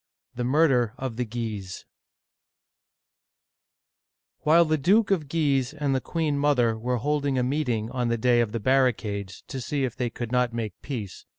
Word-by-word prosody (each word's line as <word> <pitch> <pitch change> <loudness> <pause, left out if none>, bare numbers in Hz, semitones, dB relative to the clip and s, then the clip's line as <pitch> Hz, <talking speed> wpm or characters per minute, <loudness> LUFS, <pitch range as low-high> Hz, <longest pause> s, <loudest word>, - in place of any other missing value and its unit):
THE 120 - -3
MURDER 125 -4 +2
OF 130 -3 -5
THE 125 - -1
GUISES 110 -5 -5 2.5
WHILE 165 +3 +5
the 155 -1 +1
Duke 200 +9 +3
of 160 -7 0
Guise 140 -4 +1
and 145 -3 0
the 130 - 0
queen 155 -2 -1
mother 125 -6 +2
were 125 +3 -1
holding 145 +1 0
a 125 - +2
meeting 125 -5 -1
on 125 -2 -1
the 115 0 0
Day 120 +1 +3
of 115 -3 -1
the 115 - -2
Barri 130 +2 +3
cades, 100 -3 -6
to 135 -2 -5
see 140 +3 -2
if 125 -3 -2
they 125 -1 -1
could 120 0 -6
not 125 -1 +1
make 110 -4 -3
peace. 110 -9 -6
125 Hz, 175 wpm, -26 LUFS, 115-145 Hz, 2.5 s, WHILE